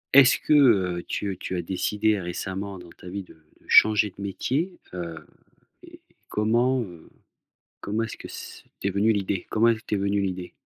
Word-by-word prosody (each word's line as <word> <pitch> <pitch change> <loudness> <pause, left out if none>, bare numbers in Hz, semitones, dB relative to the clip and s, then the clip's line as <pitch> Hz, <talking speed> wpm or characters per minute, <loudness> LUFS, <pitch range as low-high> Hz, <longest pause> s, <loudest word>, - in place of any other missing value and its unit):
Est-ce 135 -1 +7
que, - - -4
heu, 95 -11 +4
tu 100 -3 -3
tu 95 - -4
as 90 - -1
décidé 105 +4 0
récemment 95 +2 -5
dans 90 -1 -12
ta 90 - -14
vie 100 +2 -5
de - - -16 0.3
de - - -25
changer 105 -1 +6
de - - -9
métier? 140 - -2 0.2
Heu, 85 -2 -6 0.6
et - - -15 0.3
comment, 120 +4 +2
heu, 85 -6 -11 0.7
comment 105 +3 -2
est-ce 115 - -5
que - - -10
c - - -9 0.2
t'es 100 - 0
venue 100 +4 +2
l'idée? 100 -2 -2
Comment 115 +2 +3
elle 115 -1 +1
t'es 105 - -2
venue 100 +1 0
l'idée? 90 -2 -3
100 Hz, 180 wpm, -25 LUFS, 95-110 Hz, 0.7 s, Est-ce